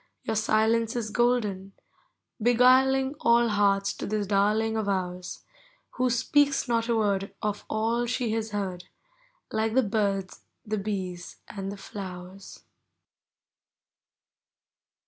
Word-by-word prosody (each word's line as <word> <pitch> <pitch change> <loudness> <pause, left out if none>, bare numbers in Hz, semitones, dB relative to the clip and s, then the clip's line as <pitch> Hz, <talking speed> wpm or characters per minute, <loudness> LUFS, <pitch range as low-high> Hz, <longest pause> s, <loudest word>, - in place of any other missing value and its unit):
Your - - -2
silence 220 +2 +2
is 220 -3 -3
golden, 210 -6 0 0.3
— - - -46 0.3
beguiling 260 +3 +4
All 235 0 +4
hearts 200 -1 +2
to - - -5
this 210 0 -1
darling 210 +3 +1
of 215 -2 -1
ours. 180 -2 -3 0.5
Who 255 - -1
Hpcaks 280 +4 +2
not 230 -1 0
a 235 - +3
word 200 -3 0
Of 210 -1 -2
all 230 +2 0
she 240 -1 -1
has 225 0 -2
heard, 190 -4 -4 0.7
Like 220 +1 0
the 260 - +5
birds, 200 -3 -1 0.2
the 215 -1 -2
bees, 185 -3 -5
and 195 -1 -5
the 200 - -8
Mowers. 185 -1 -8
215 Hz, 125 wpm, -27 LUFS, 195-235 Hz, 0.7 s, the